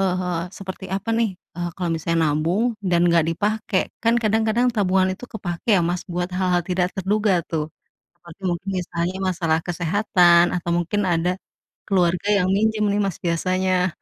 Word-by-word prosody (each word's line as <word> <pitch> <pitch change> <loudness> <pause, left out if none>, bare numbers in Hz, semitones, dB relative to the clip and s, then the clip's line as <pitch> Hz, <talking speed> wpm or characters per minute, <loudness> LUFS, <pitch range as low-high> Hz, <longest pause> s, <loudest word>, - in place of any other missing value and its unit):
eee, 180 -2 -1
seperti 190 0 -8
apa 195 +4 -2
nih, 225 -5 0 0.2
eee, 175 0 -3
kalau 175 -2 -1
misalnya 165 0 0
nabung, 180 +11 0
dan 175 -2 +2
nggak 170 -1 +4
dipakai. 210 +2 0 0.2
Kan 235 +1 +3
kadang-kadang 220 +3 +2
tabungan 190 -2 +2
itu 190 - -20
kepakai 195 0 0
ya - - +2
Mas, 175 +1 -1
buat 175 +1 -2
hal-hal 180 -1 +1
tidak 180 -1 +1
terduga 195 -1 +1
tuh. 155 -1 -3 0.5
Apalagi 170 +2 -15
mungkin 175 +3 -4
misalnya 175 +1 -3
masalah 165 -4 +1
kesehatan, 175 0 +3
atau 170 0 -3
mungkin 205 +5 -1
ada 175 +1 +1 0.5
keluarga 180 -1 +1
yang 185 - 0
minjem 215 +2 +1
nih 205 - 0
Mas 195 -3 -2
biasanya. 185 +1 0
185 Hz, 160 wpm, -22 LUFS, 175-200 Hz, 0.5 s, nggak